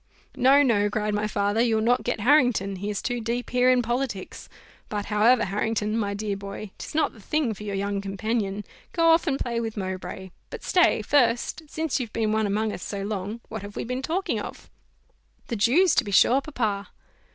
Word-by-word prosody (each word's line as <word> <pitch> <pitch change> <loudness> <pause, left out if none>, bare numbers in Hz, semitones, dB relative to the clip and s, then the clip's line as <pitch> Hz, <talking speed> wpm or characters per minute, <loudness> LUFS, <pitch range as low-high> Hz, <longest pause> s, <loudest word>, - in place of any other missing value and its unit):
"No, 270 +3 +5
no," 205 -6 +2
cried 210 0 -1
my 210 +1 0
father, 205 +1 0
"you'll 230 -2 +2
not 240 +3 +2
get 240 -3 -2
Harrington, 245 -7 +3
he 200 +3 -4
is 205 -2 -3
too 245 -2 -2
deep 235 +2 -3
here 250 0 +4
in 250 -1 +4
politics 240 -4 -3 0.4
but 205 -1 -3
however, 220 +4 +3
Harrington, 210 +2 -1
my 205 -3 -1
dear 205 -1 -2
boy, 200 +1 -7
'tis - - -8
not 315 - +2
the 225 - -16
thing 285 +1 0
for 210 - -12
your 205 -1 -4
young 200 0 -2
companion 200 0 -2 0.3
go 330 -1 +3
off 330 +2 +3
and 275 -3 +1
play 235 -3 -2
with 225 -1 -4
Mowbray: 190 -1 -5 0.2
but - - -8
stay, 350 -11 +3
first, 245 +2 +2
since 315 -2 -1
you've 235 -4 -5
been 220 -2 0
one 220 -1 +1
among 210 +1 0
us - - -7
so 200 -1 -4
long, 205 +2 -4
what 220 -2 -6
have 205 0 -9
we - - -3
been 250 +2 -3
talking 345 +8 -1
of?" - - -8 0.8
"The 235 - -1
Jews, 280 - +4
to - - +3
be 205 - -6
sure, 250 +7 +5
papa." 220 -9 -2
220 Hz, 205 wpm, -25 LUFS, 205-250 Hz, 0.8 s, No